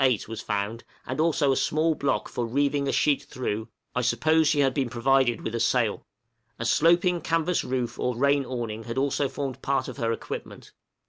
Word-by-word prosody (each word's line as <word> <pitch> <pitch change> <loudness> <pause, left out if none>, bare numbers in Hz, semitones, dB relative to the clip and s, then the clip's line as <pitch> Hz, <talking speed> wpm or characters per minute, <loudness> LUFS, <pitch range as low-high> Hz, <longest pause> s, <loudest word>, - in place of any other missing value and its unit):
8, 125 -6 +2
was 115 0 -6
found, 105 +2 -3 0.2
and 130 +3 -4
also 155 -3 +3
a - - +2
small 160 +4 +1
block 140 -2 -1
for 120 -1 -3
reeving 140 +3 +1
a - - +1
sheet 140 -2 +2
through, 110 -6 -4 0.3
I 125 - 0
suppose 155 +5 +3
she 145 -1 +3
had 135 -2 +2
been 130 -3 -1
provided 125 0 +2
with 110 - -4
a 115 - -1
sail. 115 -3 +1 0.5
A 115 - -4
sloping 175 +6 +3
canvas 165 +2 0
roof 125 -2 -3
or 125 -2 -1
rain 140 +2 +3
awning 115 -4 -5
had 115 +1 -5
also 140 0 +1
formed 135 -2 -5
part 135 -2 0
of - - -7
her 115 -3 0
equipment. 115 - -6
135 Hz, 195 wpm, -26 LUFS, 120-145 Hz, 0.5 s, also